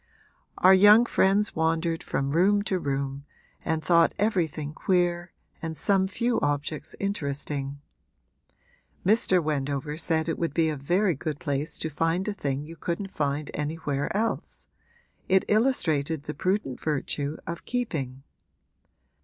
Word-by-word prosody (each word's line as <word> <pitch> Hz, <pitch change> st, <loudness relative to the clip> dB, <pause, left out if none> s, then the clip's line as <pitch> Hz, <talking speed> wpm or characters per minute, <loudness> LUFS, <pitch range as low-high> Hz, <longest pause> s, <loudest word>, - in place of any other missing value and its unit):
Our 185 Hz, +1 st, +7 dB
young 205 Hz, +5 st, +7 dB
friends 205 Hz, -1 st, +2 dB
wandered 165 Hz, +1 st, 0 dB
from 135 Hz, -5 st, -2 dB
room 200 Hz, +6 st, +3 dB
to 190 Hz, -3 st, -1 dB
room 140 Hz, -1 st, -3 dB, 0.4 s
and 160 Hz, -1 st, -1 dB
thought 170 Hz, -1 st, +4 dB
everything 165 Hz, -8 st, 0 dB
queer 175 Hz, 0 st, 0 dB, 0.3 s
and 160 Hz, -1 st, -4 dB
some 190 Hz, +3 st, +2 dB
few 235 Hz, +5 st, 0 dB
objects 145 Hz, +1 st, -2 dB
interesting; 140 Hz, -6 st, -3 dB, 1.2 s
Mr. 190 Hz, -3 st, +3 dB
Wendover 145 Hz, 0 st, -2 dB
said 160 Hz, -1 st, 0 dB
it 165 Hz, -, -2 dB
would 165 Hz, -4 st, -2 dB
be 165 Hz, -1 st, +3 dB
a 155 Hz, -, -2 dB
very 175 Hz, +7 st, +1 dB
good 150 Hz, +1 st, -4 dB
place 145 Hz, +1 st, -2 dB
to 160 Hz, -, -3 dB
find 165 Hz, +5 st, 0 dB
a 210 Hz, -, -1 dB
thing 140 Hz, -7 st, -2 dB
you 165 Hz, +2 st, -10 dB
couldn't 180 Hz, +5 st, -3 dB
find 145 Hz, 0 st, -2 dB
anywhere 145 Hz, -1 st, -2 dB
else 225 Hz, +1 st, -3 dB, 0.6 s
it 190 Hz, 0 st, +4 dB
illustrated 160 Hz, -, +1 dB
the 150 Hz, -, -5 dB
prudent 185 Hz, -5 st, -1 dB
virtue 145 Hz, 0 st, -2 dB
of 170 Hz, 0 st, -6 dB
keeping. 140 Hz, -, -3 dB
160 Hz, 135 wpm, -26 LUFS, 145-190 Hz, 1.2 s, Our